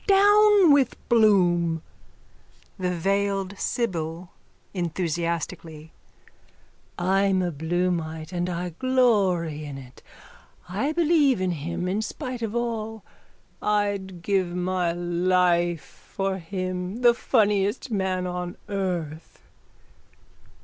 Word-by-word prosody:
Down 410 -2 +6
with 275 -4 +3
Bloom! 175 -8 +3 1.0
THE 180 -1 0
VEILED 195 +2 -1
SIBYL: 175 -6 -3 2.7
I'm 190 +1 +2
a 175 - -1
Bloomite 160 0 -2
and 175 0 -1
I 175 0 -3
glory 195 - +2
in 145 -2 -7
it. 130 -1 -13 0.7
I 210 +12 -1
believe 310 - +3
in 185 -1 0
him 170 +3 -3
in 195 +4 0
spite 250 +2 -5
of 225 0 -3
all. 225 -2 -3 0.6
I'd 200 -4 -1
give 190 -1 +1
my 180 -1 0
life 175 -1 +1 0.3
for 195 0 -1
him, 185 +4 -4
the 240 -1 +6
funniest 210 0 +1
man 190 -3 -1
on 180 0 -4
earth. 175 -6 -4
185 Hz, 95 wpm, -25 LUFS, 175-215 Hz, 2.7 s, Down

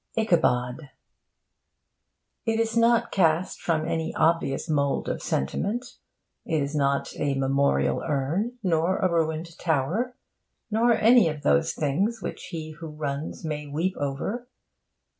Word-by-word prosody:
ICHABOD 140 - +1 1.6
It 225 0 +1
is 230 0 0
not 235 0 +3
cast 170 -1 +1
from 160 -2 0
any 160 -1 -2
obvious 160 -3 +1
mould 140 -3 0
of - - -2
sentiment. 210 - -2 0.5
It 160 - 0
is 140 +2 -4
not 140 -1 +1
a 140 -2 0
memorial 135 +1 +1
urn, 165 - -1
nor 175 0 +2
a 185 - +2
ruined 165 0 -1
tower, 175 - 0 0.6
nor 230 +3 +3
any 225 -4 +5
of 150 -1 -6
those 165 0 +3
things 190 +11 0
which - - -6
he 160 -3 -6
who 160 +1 -9
runs 150 0 -5
may 150 -1 -3
weep 165 +6 -1
over. 145 - -3
160 Hz, 130 wpm, -26 LUFS, 145-200 Hz, 1.6 s, any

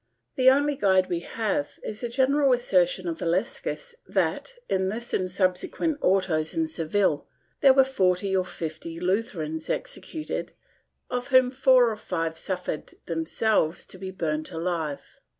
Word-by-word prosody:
The 255 0 +6
only 285 +2 +3
guide 190 -5 +3
we 175 -2 0
have 195 -5 -2
is 215 +1 -6
the 240 - -2
general 270 +2 +3
assertion 185 -6 +2
of 165 -1 -3
Illescas 190 - -2
that, - - -1
in 190 0 +1
this 235 +4 -5
and 185 -1 0
subsequent 185 - 0
autos 180 -5 +1
in 325 -1 +1
Seville, 165 - 0 0.3
there 270 -2 +7
were 270 - +7
forty 190 -6 +1
or 185 - +3
fifty 165 -1 -6
Lutherans 180 -5 -2
executed, 310 -2 -4 0.6
of 250 0 -2
whom 255 -2 +5
four 255 -2 +5
or - - -3
five 165 -5 -3
suffered 180 -3 -4
themselves 165 +1 0
to 185 - -12
be 190 0 -5
burnt 155 -3 -2
alive. 165 -3 -4
190 Hz, 145 wpm, -26 LUFS, 170-250 Hz, 0.6 s, there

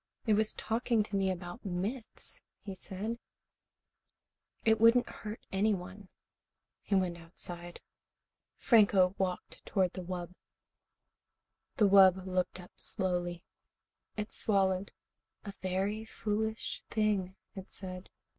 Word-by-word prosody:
"It 220 - +4
was 215 +1 +3
talking 230 -1 +1
to 205 -1 -5
me 195 -1 +2
about 180 +4 -5
myths," 205 +6 -4 0.2
he 195 - -5
said. 200 +5 -4 1.5
"It 220 -1 +4
wouldn't 230 +2 +6
hurt 215 +1 -8
anyone." 195 -1 -1 0.7
He 200 - 0
went 180 -2 +1
outside. 175 +1 -8 0.8
Franco 200 -5 +5
walked 185 -2 -3
toward 185 -3 +1
the 185 - -5
wub. 175 -1 -5 1.5
The 210 - +6
wub 190 -1 +7
looked 185 0 -1
up 180 - -12
slowly. 175 -3 0 0.7
It 210 0 -4
swallowed. 195 -2 +2 0.5
"A 200 - -5
very 195 +4 -1
foolish 220 0 -2
thing," 205 -4 +1 0.2
it 190 -1 -8
said. 185 -1 -7
195 Hz, 110 wpm, -32 LUFS, 185-215 Hz, 1.5 s, wub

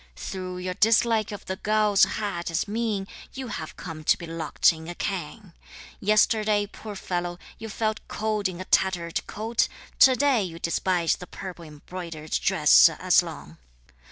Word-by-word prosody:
Through 185 - -6
your 180 0 -3
dislike 220 +1 +3
of 205 - -8
the 190 - -4
gauze 210 -1 +3
hat 200 -6 -3
as 165 +3 -1
mean, 210 -2 -2 0.3
You 265 -2 -6
have 160 -7 -6
come 160 -3 -8
to - - +4
be 170 - -8
locked 165 0 +2
in 160 0 -10
a 175 - -6
cangue; 190 +1 -5 0.5
Yesterday, 215 0 +3
poor 210 +1 -9
fellow, 175 -2 -3 0.2
you 225 0 -7
felt 220 +1 -2
cold 215 -2 -1
in 180 -1 -8
a 185 - -6
tattered 175 -4 +1
coat, 225 +2 0 0.3
To 260 -1 +8
day, 270 -3 +3
you 175 -4 -5
despise 170 0 0
the 180 - -10
purple 180 -3 -8
embroidered 155 +1 -9
dress 60 -1 +6
as - - +3
long! 75 +3 -9
190 Hz, 160 wpm, -25 LUFS, 170-215 Hz, 0.5 s, To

